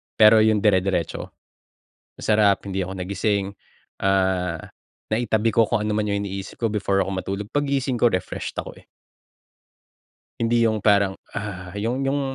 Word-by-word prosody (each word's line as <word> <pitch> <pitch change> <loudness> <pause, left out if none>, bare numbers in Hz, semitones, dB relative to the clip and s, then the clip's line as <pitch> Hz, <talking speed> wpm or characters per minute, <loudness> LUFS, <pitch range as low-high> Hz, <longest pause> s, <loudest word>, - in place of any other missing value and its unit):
pero 110 0 +7
yung 110 -1 +3
dire-diretso, 95 -5 +1 0.9
masarap, 105 -2 +2
hindi 95 -1 -2
ako 95 +1 -5
nagising, 100 +2 -1 0.5
ah, 95 -3 +1 0.5
naitabi 110 -1 +1
ko 115 -1 +3
kung 105 -3 0
ano 105 - 0
man 105 -1 0
yung 100 0 -1
iniisip 95 0 -6
ko 115 -2 -1
before 100 -2 +1
ako 95 - -4
matulog, 100 +2 -4
paggising 140 -4 0
ko, 120 - +6
refreshed 90 -3 -4
ako, - - -5
eh. - - -28 1.6
Hindi 115 0 +3
'yong 110 -2 0
parang 100 -2 +3 0.2
"Ugh", 95 -3 -5
'yong, 120 +6 -1
'yong 135 +1 0
105 Hz, 145 wpm, -23 LUFS, 95-110 Hz, 1.6 s, pero